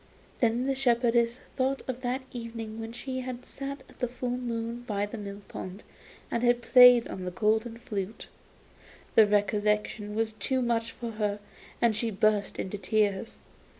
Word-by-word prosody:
Then 235 +1 +2
the 275 - +1
shepherdess 240 -2 +2
thought 265 +1 0
of 255 -1 -4
that 255 +1 -1
evening 230 -2 -6
when 225 0 -5
she 260 +2 -4
had 250 -1 -6
sat 275 0 -6
at - - -19
the 250 - +1
full 245 +1 -4
moon 235 -1 -3
by 205 -4 -1
the 205 - -7
mill 200 0 -7
pond 190 +3 -7 0.5
and 235 - 0
had 240 0 +3
played 250 -2 +8
on 185 - -6
the 180 - -2
golden 220 +5 +1
flute; 215 -3 -5 0.9
the 220 -2 +7
recollection 210 0 +1
was 220 0 0
too 240 +5 -1
much 230 -1 0
for 235 -2 -6
her, 210 -2 -1 0.4
and 230 -2 +3
she 225 +2 0
burst 210 0 +1
into 195 +2 -4
tears. 205 +1 0
230 Hz, 165 wpm, -29 LUFS, 210-245 Hz, 0.9 s, played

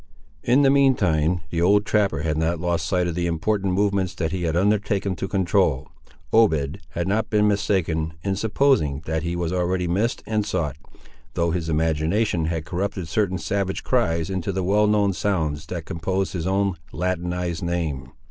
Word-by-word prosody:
In 130 +4 +3
the 135 - +5
mean 135 -1 +5
time, 85 -3 +1
the 85 - -1
old 100 +4 +4
trapper 100 -8 +1
had 80 -1 0
not 80 +2 0
lost 85 -2 -1
sight 90 +1 +1
of 85 - -2
the 85 +1 -1
important 95 +3 0
movements 100 -2 0
that 80 -2 -2
he 90 -2 -2
had 80 -1 0
undertaken 100 0 +1
to 95 - -3
control. 90 -7 +1 0.4
Obed 80 -11 +3
had 85 +1 -2
not 110 +3 0
been 105 -1 +3
mistaken 85 -6 0
in 95 -1 0
supposing 105 - +1
that 80 0 -1
he 85 +1 -3
was 85 0 -2
already 90 0 0
missed 100 +7 0
and 110 -1 0
sought, 90 -8 -2 0.6
though 85 -1 +1
his 80 -1 -2
imagination 80 +4 +1
had 80 -1 -2
corrupted 95 -1 -3
certain 95 -1 0
savage 95 0 -2
cries 95 -8 0
into 95 0 -2
the 95 0 -2
well 105 +3 +3
known 105 -2 +2
sounds 80 -5 -1
that 85 -2 -5
composed 95 +3 -2
his 90 -1 -3
own 95 -1 +1
latinized 90 -1 -2
name. 80 -7 -3
90 Hz, 175 wpm, -23 LUFS, 80-100 Hz, 0.6 s, the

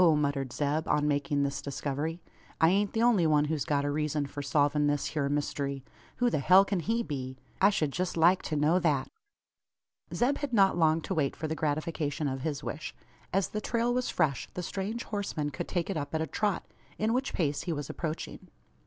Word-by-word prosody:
muttered 140 -3 0
Zeb, 150 +4 -1
on 150 0 +2
making 145 0 +1
this 140 0 -2
discovery; 145 +4 -3 0.4
"I 160 - +6
ain't 200 +2 +1
the 225 - +1
only 215 -9 +4
one 150 -1 +4
who's 150 -1 -1
got 145 -1 +1
a - - 0
reezun 150 0 -1
for 145 - -6
solvin' 145 +1 +2
this 145 -1 0
hyur 140 -3 0
myst'ry! 140 -1 -2 0.3
Who 245 -1 +2
the - - +1
hell 185 +7 +6
kin 195 -2 -1
he 225 +7 0
be? 130 - -5 0.2
I 195 - +7
shed 155 -8 0
jest 180 +3 -2
like 175 +3 +5
to 155 - -1
know 150 +5 +3
that." 150 -6 +1 1.0
Zeb 265 +4 +1
had 285 -4 -4
not 195 -3 +5
long 160 -1 +3
to - - -3
wait 145 -4 0
for 155 - -4
the 155 - -2
gratification 155 -1 -1
of 135 -1 -3
his 145 -1 -3
wish. 155 - -5 0.4
As 195 0 +1
the 215 - -3
trail 235 +2 0
was 250 0 0
fresh, 150 -7 0
the 180 - -3
strange 205 +7 -3
horseman 195 -8 -3
could 130 - -5
take 175 -3 -1
it 195 - -2
up 145 +1 -4
at 160 - 0
a - - 0
trot 200 +5 -1 0.3
in 220 +2 +1
which 260 +2 0
pace 145 -4 0
he 175 - -3
was 145 -3 -3
approaching. 160 -1 -5
155 Hz, 210 wpm, -29 LUFS, 145-190 Hz, 1.0 s, I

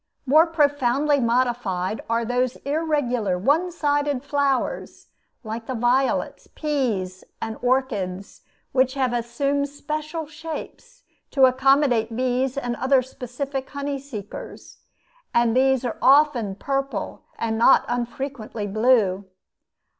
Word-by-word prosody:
More 310 +5 +5
profoundly 290 -2 +2
modified 235 -6 0
are 230 0 +1
those 245 +1 0
irregular 280 - 0
one 300 - +1
sided 290 -4 0
flowers, 280 -2 -1 0.3
like 225 +1 -6
the 260 - -3
violets, 245 +3 0
peas, 225 -12 -2 0.2
and 225 0 -4
orchids, 205 -8 -1 0.3
which 260 0 +2
have 260 -3 0
assumed 275 +4 -1
special 305 +2 -5
shapes 325 +11 -9 0.3
to 270 -2 +5
accommodate 260 -3 +3
bees 255 +1 0
and 245 -3 -2
other 260 0 +3
specific 265 +2 -5
honey 280 -1 -4
seekers; 220 -7 -9 0.6
and 235 -1 +3
these 265 0 +3
are 240 - -4
often 265 -8 +4
purple 275 +4 -3 0.2
and 225 -1 -2
not 235 - +6
unfrequently 240 -2 -4
blue. 205 -2 +2
260 Hz, 110 wpm, -23 LUFS, 235-285 Hz, 0.6 s, not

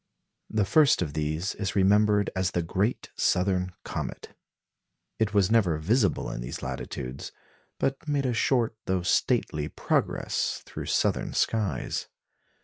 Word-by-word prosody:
The 105 -2 +1
first 135 - +4
of 75 -4 -5
these 80 +5 -1
is 100 -1 -3
remembered 105 +1 +4
as 95 -2 +1
the 85 - +1
"Great 100 +8 -1
Southern 90 0 +1
Comet." - - -6 0.8
It 105 -2 0
was 100 0 +4
never 95 -9 +3
visible 100 - +1
in - - -5
these - - -6
latitudes, 65 +2 -5 0.5
but 135 +3 -2
made 145 -2 0
a 125 - +1
short 115 -1 +1
though 95 -1 0
stately 75 -3 +1
progress - - -1
through - - -7
southern - - +1
skies. 110 -4 -1
100 Hz, 135 wpm, -27 LUFS, 90-110 Hz, 0.8 s, first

